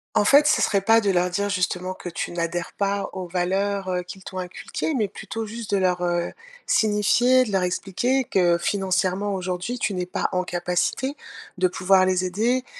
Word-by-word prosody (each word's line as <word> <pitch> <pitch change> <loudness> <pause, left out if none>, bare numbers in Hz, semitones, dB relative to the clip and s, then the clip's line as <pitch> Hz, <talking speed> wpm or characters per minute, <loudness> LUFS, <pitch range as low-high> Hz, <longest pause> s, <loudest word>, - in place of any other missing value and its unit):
En 205 - +4
fait, 285 +7 +6
ce 260 -5 +3
serait 200 -3 +2
pas 225 +3 +5
de 205 -3 0
leur 180 -1 +2
dire 200 +3 -1
justement 185 -1 -1
que 185 - -8
tu 170 - -4
n'adhères 170 0 -3
pas 200 0 -1
aux 185 -1 -5
valeurs, 190 +2 -1
heu, 180 -1 -1
qu'ils 185 +1 -11
t'ont 185 - -6
inculquées, 180 - -4
mais 225 -7 +1
plutôt 225 +3 -6
juste 225 0 -7
de - - +4
leur, 180 -2 +1
heu, 175 -1 -1 0.3
signifier, 240 +4 +3
de 215 - -5
leur 190 -1 +2
expliquer, 240 +8 0
que 175 -4 +2
financièrement 190 +2 0
aujourd'hui, 185 +5 -3
tu 205 - -1
n'es 180 -1 -2
pas 180 - -1
en 185 0 +1
capacité 180 +10 -1 0.4
de 185 0 +2
pouvoir 185 +1 +3
les 185 0 +1
aider 235 +8 0
190 Hz, 190 wpm, -24 LUFS, 180-210 Hz, 0.4 s, fait